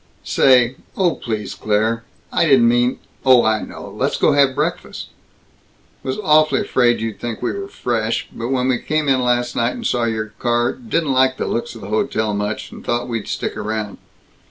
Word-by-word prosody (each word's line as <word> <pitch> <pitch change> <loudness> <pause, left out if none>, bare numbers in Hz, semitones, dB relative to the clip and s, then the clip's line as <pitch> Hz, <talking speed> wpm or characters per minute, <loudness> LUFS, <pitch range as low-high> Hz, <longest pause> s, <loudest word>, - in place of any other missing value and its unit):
"Say, 130 -1 +4 0.2
oh 180 -3 +3
please, 110 -4 -4
Claire 110 +2 0 0.3
I - - +3
didn't 130 -6 +5
mean 120 +1 +2
" - - -35
"Oh, 130 -2 +6
I 110 -1 +2
know! - - -8
Let's - - -11
let's - - -1
go - - +3
have 140 -2 +3
breakfast." 155 +4 -3 0.9
"Was 130 - -3
awfully 155 0 +4
afraid 120 -2 +2
you'd 110 -2 -4
think 115 -2 -4
we - - 0
were 200 0 -5
fresh, 115 - -2
but 115 - -4
when 130 -1 0
we 130 -2 +1
came 155 -1 -1
in 130 -2 +3
last 120 0 0
night, 120 +1 0
and 235 - -7
saw 120 - +1
your 110 -2 -3
car 120 0 +1
didn't 165 - -1
like 130 0 +3
the - - -2
looks 120 0 -3
of 115 - -10
the 100 - -8
hotel 110 0 0
much, 105 +1 -3
and - - -11
thought 120 0 -1
we'd 115 -3 -3
stick - - -3
around." 110 -1 -4
120 Hz, 200 wpm, -19 LUFS, 110-130 Hz, 0.9 s, Oh